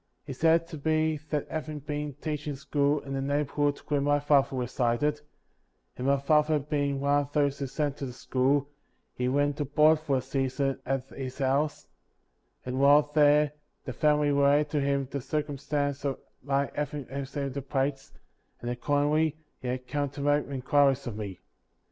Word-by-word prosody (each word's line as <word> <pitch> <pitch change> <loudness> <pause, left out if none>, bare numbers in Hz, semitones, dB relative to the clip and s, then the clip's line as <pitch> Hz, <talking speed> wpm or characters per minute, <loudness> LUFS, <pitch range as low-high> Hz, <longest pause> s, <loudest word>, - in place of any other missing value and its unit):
He 140 - -5
stated 165 +4 +3
to 155 -3 -8
me 155 -1 +1
that 150 -2 -1
having 155 -1 -4
been 150 -1 -4
teaching 150 -1 -4
school 140 +1 0
in 135 - -7
the 135 - -1
neighborhood 145 +1 0
where 145 -2 +1
my 145 +1 +2
father 140 -2 +3
resided, 125 +4 0 0.7
and 125 - -3
my 140 0 +4
father 150 +2 +3
being 140 -1 -1
one 140 +1 +3
of 145 0 -8
those 145 -2 +1
who 140 - -2
sent 145 +1 -2
to 140 - -4
the - - -6
school, 135 +2 +1 0.5
he 125 - -2
went 145 +2 +1
to 145 - -1
board 150 +3 +4
for 145 -4 0
a - - -1
season 135 +1 -1
at 135 0 -1
his 130 -1 -6
house, 140 +2 0 0.8
and 130 +1 -3
while 145 +1 +5
there 150 -1 +5 0.3
the - - -4
family 150 -1 +2
related 145 +1 +3
to 150 - +1
him 140 0 +1
the 140 - -3
circumstance 145 0 -2
of 140 -2 -1 0.2
my 140 +1 0
having 145 -1 -3
received 140 0 -4
the 140 - -3
plates, 135 +1 -2 0.5
and 120 - -4
accordingly 145 +4 +1 0.2
he 125 - -6
had 125 0 -3
come 145 +1 -1
to 140 +1 -8
make 145 +1 +2
inquiries 135 0 +2
of 120 -4 -5
me. 100 -4 -6
140 Hz, 175 wpm, -28 LUFS, 135-150 Hz, 0.8 s, while